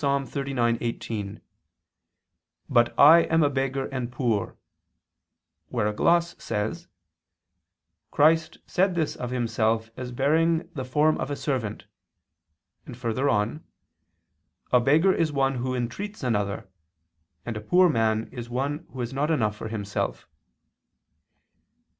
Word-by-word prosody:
39:18, 120 -6 -2 1.3
"But 120 0 +2
I 160 +4 +9
am 160 -1 +2
a 145 - +2
beggar 135 0 -1
and 125 -3 -4
poor"; 120 -6 -1 1.1
where 115 -4 -1
a 105 - 0
gloss 170 +9 +2
says: 115 - -3 1.2
"Christ 155 +2 +3
said 185 0 +1
this 160 -3 -1
of 125 - -5
Himself 115 -2 0
as 125 -1 -6
bearing 160 +6 +2
the 135 - -4
'form 150 +5 +2
of - - -3
a 145 - -2
servant,'" 125 -8 -3 1.0
and 125 - -9
further 125 +3 -1
on: 105 +9 0 1.1
"A 125 - +6
beggar 155 +9 +4
is 160 -2 0
one 135 -2 +1
who 130 +1 -2
entreats 150 - -4
another, 105 -5 -1 0.8
and 120 - -4
a 110 - -5
poor 180 +12 +4
man 110 -6 +1
is 120 -2 -7
one 140 +6 -3
who 130 - -6
has 120 +2 -4
not 145 +3 0
enough 110 -10 +1
for 110 - -6
himself." 105 -2 -3
130 Hz, 125 wpm, -26 LUFS, 115-150 Hz, 1.3 s, I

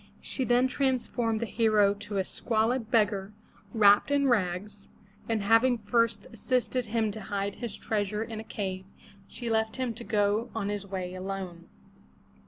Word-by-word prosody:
She 260 - -3
then 245 +1 +4
transformed 250 -4 0
the - - 0
hero 215 -2 +3
to 205 0 -6
a 190 - +1
squalid 225 +2 0
beggar, 210 -3 +1 0.4
wrapped 205 -1 +5
in 285 -1 +2
rags, 200 -2 -1 0.4
and 220 -3 0
having 225 +4 +4
first 225 -1 +1
assisted 250 +1 0
him 220 -1 0
to 215 +1 -7
hide 200 0 -3
his 235 -4 -5
treasure 210 0 -1
in 225 -1 -6
a - - -6
cave, 190 -3 -4 0.4
she 240 - -7
left 220 -1 +1
him 255 -3 -2
to 230 +2 -9
go 210 +2 +1
on 205 -3 -2
his 205 -1 -3
way 185 -2 -4
alone. 185 -2 -6
215 Hz, 160 wpm, -28 LUFS, 200-235 Hz, 0.4 s, wrapped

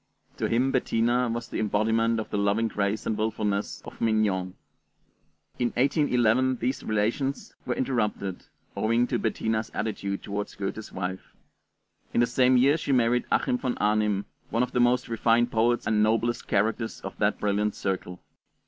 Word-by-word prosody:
To - - 0
him 125 +4 +2
Bettina 120 -1 +1
was 115 +1 -3
the - - -4
embodiment 110 +2 +1
of 110 - -6
the 105 - -1
loving 100 +3 +2
grace 105 0 -1
and 110 - 0
willfulness 105 -2 -2
of - - -11
'Mignon.' 105 -5 +1 1.0
In 120 - +2
1811 130 -2 +2
these 125 +2 -2
relations 115 +6 -1
were 125 - 0
interrupted, 105 -7 -2 0.3
owing 115 +2 +2
to - - -1
Bettina's 110 0 -1
attitude 100 -2 -3
toward 100 0 -4
Goethe's 100 +2 -5
wife. 95 0 -5 0.8
In - - +4
the 120 - +5
same 125 +1 +3
year 140 +5 +4
she 150 - -3
married 125 -1 +2
Achim 125 - +1
von 125 -2 -2
Arnim, 105 -1 +1 0.2
one 115 +3 +1
of 125 - -3
the 125 - 0
most 125 +1 +3
refined 115 +1 +2
poets 115 +1 +2
and 110 -1 +2
noblest 115 +2 +1
characters 110 +3 0
of - - -7
that - - +1
brilliant 105 0 0
circle. 95 -2 -4
115 Hz, 155 wpm, -27 LUFS, 105-120 Hz, 1.0 s, the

